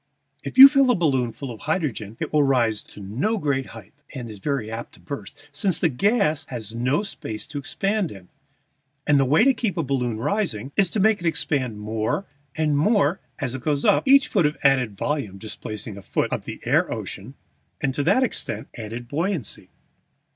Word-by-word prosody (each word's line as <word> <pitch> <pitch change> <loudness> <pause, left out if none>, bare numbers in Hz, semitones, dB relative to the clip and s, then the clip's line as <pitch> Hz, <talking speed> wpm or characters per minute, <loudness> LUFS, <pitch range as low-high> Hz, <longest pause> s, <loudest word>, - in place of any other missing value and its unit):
If - - -6
you 270 +1 +14
fill 275 -2 +3
a 245 - +4
balloon 135 - +1
full 135 +2 -7
of 110 - -9
hydrogen 135 - -2
it - - -4
will 150 - +5
rise 120 -6 +2
to - - -14
no 125 - -1
great 140 -7 -1
height 110 -3 -12 0.2
(and 120 -4 -6
is 105 - -10
very 125 -2 -2
apt 115 +1 -6
to - - -19
burst), 140 -10 -9
since 165 +5 0
the 165 - +3
gas 160 - +1
has 110 -4 -7
no 125 - 0
space 110 - -6
to 145 -2 -6
expand 195 +5 -1
in, 95 -3 -12 0.8
and 145 -1 +4
the 135 - +3
way 150 +10 +4
to 270 +1 +5
keep 225 -7 -2
a 165 - +1
balloon 125 -5 -1
rising 135 - -2
is 195 -3 +3
to 210 - -2
make 215 +1 +4
it 175 - -2
expand 130 -9 -1
more 110 - -2 0.3
and 150 -2 +1
more 190 -1 +2 0.2
as 130 -3 -2
it 130 - -5
goes 145 +1 -1
up, - - +3
each 275 +1 +6
foot 155 - +2
of 150 - -4
added 130 -7 +3
volume 125 -10 -2
displacing 105 0 -6
a - - -8
foot - - -1
of - - -3
the - - -7
air - - +2
ocean - - -6 0.4
and 135 - -1
to 145 - -1
that 255 - +3
extent 250 - -1
adding 115 +1 -6
buoyancy. 155 - -2
140 Hz, 200 wpm, -23 LUFS, 115-175 Hz, 0.8 s, you